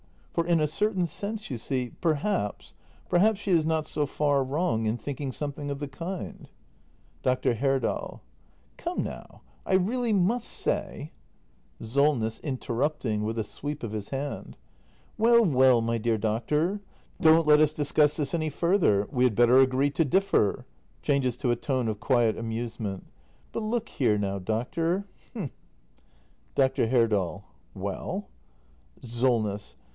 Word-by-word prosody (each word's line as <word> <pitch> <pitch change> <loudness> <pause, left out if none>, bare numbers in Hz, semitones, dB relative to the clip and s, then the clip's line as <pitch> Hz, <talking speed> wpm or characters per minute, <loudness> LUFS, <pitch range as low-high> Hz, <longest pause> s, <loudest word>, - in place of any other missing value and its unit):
For, 170 0 0
in 170 -2 +3
a 155 - +3
certain 190 +3 0
sense, 205 +4 -4
you 125 - -2
see, 125 -1 -2
perhaps— 160 - -1 0.3
perhaps 200 +3 +3
she 200 - -2
is 165 -3 +4
not 160 -1 0
so 150 -1 -1
far 145 -1 +1
wrong 130 -5 0
in 110 +2 0
thinking 135 +3 -4
something 145 +1 -4
of 140 -1 -3
the 145 -1 -4
kind. 170 +7 -6 0.7
Dr. 130 -1 +1
Herdal. 135 0 -1 0.6
Come - - -2
now, - - -8 0.2
I - - -2
really 225 +5 +2
must 205 +5 +1
say - - -2 0.7
SOLNESS. 120 -1 +1
[Interrupting, 130 -4 -2
with 110 +2 -2
a 110 - 0
sweep 145 +7 -5
of 115 - -3
his 105 -2 -4
hand.] 140 +1 -5 0.6
Well, 235 +1 +5
well, 130 - +5
my 115 0 0
dear 115 0 +1
doctor 150 - 0 0.2
— - - -23
don't 160 0 +6
let 150 0 +6
us 155 -1 +4
discuss 150 0 +2
this 145 -3 -2
any 155 -2 0
further. 150 - +2
We 125 -1 +2
had 120 -5 +2
better 120 +2 +5
agree 135 +2 +3
to 160 +3 +1
differ. 135 - +2 0.4
[Changes 135 -4 +1
to 125 -1 0
a - - +2
tone 130 -2 -1
of 105 -2 -2
quiet 120 -4 +2
amusement.] 115 -3 -4 0.5
But - - -3
look 225 +1 -2
here 115 -6 +1
now, 100 -1 -2
doctor 165 - -1 0.2
— - - -31
h'm 185 - -4 1.0
Dr. 130 -3 +2
Herdal. 105 -6 +1 0.3
Well? - - -4 0.7
SOLNESS. 115 -4 0
135 Hz, 150 wpm, -27 LUFS, 115-165 Hz, 1.0 s, don't